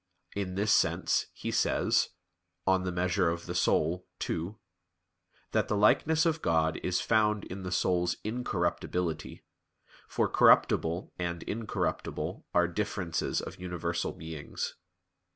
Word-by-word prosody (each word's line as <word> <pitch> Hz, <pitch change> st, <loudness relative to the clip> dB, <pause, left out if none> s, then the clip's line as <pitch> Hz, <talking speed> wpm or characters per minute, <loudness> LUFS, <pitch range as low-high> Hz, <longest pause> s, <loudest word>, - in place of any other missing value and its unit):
In 95 Hz, -2 st, -3 dB
this 105 Hz, +2 st, +3 dB
sense -, -, +2 dB
he -, -, -5 dB
says -, -, +2 dB, 0.6 s
(De 95 Hz, 0 st, +4 dB
Quant. 95 Hz, -, -4 dB
Animae 90 Hz, -1 st, +1 dB, 0.3 s
ii) 85 Hz, +6 st, -3 dB, 1.0 s
that 110 Hz, -1 st, +1 dB
the 105 Hz, -, 0 dB
likeness 155 Hz, +10 st, +4 dB
of 160 Hz, -1 st, +1 dB
God 80 Hz, -1 st, +2 dB
is 90 Hz, -1 st, 0 dB
found 105 Hz, -2 st, +2 dB
in 95 Hz, +2 st, -7 dB
the 90 Hz, -1 st, -5 dB
soul's 90 Hz, -1 st, +1 dB
incorruptibility; 90 Hz, -6 st, -2 dB, 0.6 s
for -, -, +1 dB
corruptible 85 Hz, +3 st, +4 dB
and 85 Hz, -1 st, -3 dB
incorruptible 110 Hz, +1 st, -3 dB
are 90 Hz, 0 st, +3 dB
differences 90 Hz, -2 st, -2 dB
of -, -, -8 dB
universal 85 Hz, -1 st, -2 dB
beings. 80 Hz, -2 st, -5 dB
90 Hz, 115 wpm, -30 LUFS, 85-105 Hz, 1.0 s, De